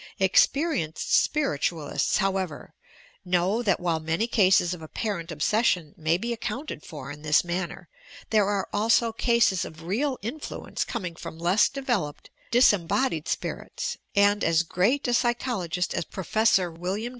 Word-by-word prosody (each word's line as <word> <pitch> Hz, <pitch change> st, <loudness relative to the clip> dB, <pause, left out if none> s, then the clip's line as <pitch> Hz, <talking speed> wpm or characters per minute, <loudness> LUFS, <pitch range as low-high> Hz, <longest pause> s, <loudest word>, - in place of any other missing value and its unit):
Experienced 195 Hz, -, +2 dB
Spiritual 160 Hz, -, +1 dB
ists, -, -, +1 dB
however, 190 Hz, -5 st, -2 dB, 0.5 s
know 185 Hz, +5 st, +1 dB
that 200 Hz, -6 st, +1 dB
while 170 Hz, -2 st, 0 dB
many 160 Hz, +7 st, -1 dB
cases 190 Hz, -6 st, +3 dB
of 175 Hz, -, -8 dB
appar 200 Hz, +5 st, -3 dB
ent 165 Hz, +1 st, -8 dB
obsession 165 Hz, 0 st, +1 dB
may 160 Hz, +1 st, +1 dB
be 235 Hz, +5 st, -3 dB
accounted 230 Hz, -, -5 dB
for 145 Hz, -4 st, -8 dB
in 145 Hz, +1 st, -10 dB
this 150 Hz, 0 st, +3 dB
manner, 175 Hz, 0 st, -4 dB, 0.4 s
there 210 Hz, -3 st, +4 dB
are 200 Hz, -2 st, -1 dB
also 230 Hz, +2 st, +3 dB
cases 230 Hz, -5 st, +2 dB
of 160 Hz, +1 st, -9 dB
real 250 Hz, -, -1 dB
influence 275 Hz, +8 st, -4 dB
coming 180 Hz, -8 st, -5 dB
from 165 Hz, -1 st, -8 dB
less 175 Hz, +5 st, +3 dB
devel 250 Hz, -, -1 dB
oped, 145 Hz, -, -17 dB, 0.2 s
disembodied 205 Hz, -, +2 dB
spirits, -, -, -3 dB, 0.2 s
and 205 Hz, +1 st, +4 dB
as 165 Hz, 0 st, +3 dB
great 210 Hz, -, +1 dB
a 245 Hz, -, +1 dB
psychologist 235 Hz, -8 st, 0 dB
as -, -, -1 dB
Prof. 215 Hz, +6 st, 0 dB
Wm. 185 Hz, +5 st, -3 dB
190 Hz, 145 wpm, -26 LUFS, 165-230 Hz, 0.5 s, there